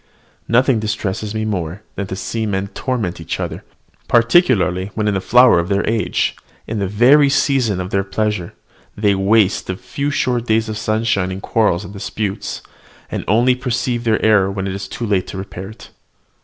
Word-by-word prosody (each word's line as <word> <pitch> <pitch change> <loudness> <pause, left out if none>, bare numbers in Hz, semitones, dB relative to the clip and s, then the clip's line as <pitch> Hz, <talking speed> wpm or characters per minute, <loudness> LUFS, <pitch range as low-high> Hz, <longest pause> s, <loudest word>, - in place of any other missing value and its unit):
Nothing 125 0 +3
distresses 105 -1 -3
me 110 0 -1
more 95 -2 -3
than 100 0 -4
to 95 - -5
see 110 +3 -3
men 100 -1 -2
torment 110 -9 -3
each 80 - -4
other; - - -4 0.4
particularly 115 - +3
when 110 -1 0
in 105 - +2
the 95 - -1
flower 125 -3 +5
of 85 +2 -2
their 100 0 0
age, 110 -1 0 0.3
in 110 -1 -3
the 100 - 0
very 130 +8 +5
season 130 -8 +1
of 90 0 -5 0.2
pleasure, 105 -4 -2 0.4
they 105 -1 +3
waste 100 +1 +2
their 95 - -2
few 140 +9 -4
short 125 -4 -1
days 110 0 +2
of 110 - -4
sunshine 110 -4 0
in 95 - -5
quarrels 105 -4 +1
and 100 - -9
disputes, 100 +1 -4 0.5
and - - -3
only 120 +5 +4
perceive 125 -1 -2
their 110 -2 +2
error 105 -3 +4
when 95 -1 -3
it 95 - -3
is 100 0 -5
too 120 - -5
late 100 -4 0
to - - -7
repair 95 0 -7
it. 110 - -13
105 Hz, 185 wpm, -18 LUFS, 95-115 Hz, 0.5 s, flower